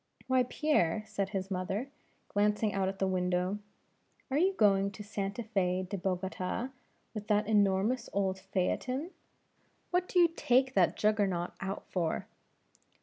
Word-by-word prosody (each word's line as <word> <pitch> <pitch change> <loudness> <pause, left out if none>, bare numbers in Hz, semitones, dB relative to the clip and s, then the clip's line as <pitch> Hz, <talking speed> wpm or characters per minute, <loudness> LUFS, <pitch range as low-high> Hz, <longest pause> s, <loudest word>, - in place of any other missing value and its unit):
"Why, 260 0 +3
Pierre," 220 - +1
said 200 -3 -2
his 195 -1 -3
mother, 195 +8 -2 0.4
glancing 210 +1 +1
out 195 -1 +1
at 195 0 -3
the 195 - +1
window, 180 +1 0 0.7
"are 270 - +2
you 380 +3 +3
going 200 - +4
to 210 - -8
Santa 200 +2 -3
Fe 185 -4 0
De 200 - -3
Bogota 185 +5 -2 0.4
with 210 -2 -6
that 210 0 +3
enormous 205 +3 +2
old 190 -1 0
phaeton; 250 - -1 0.8
what 360 0 +1
do - - -2
you 345 -1 +8
take 260 +2 +3
that - - +3
Juggernaut 200 -5 +1
out 195 +1 -4
for?" 170 -4 -1
200 Hz, 145 wpm, -31 LUFS, 190-220 Hz, 0.8 s, you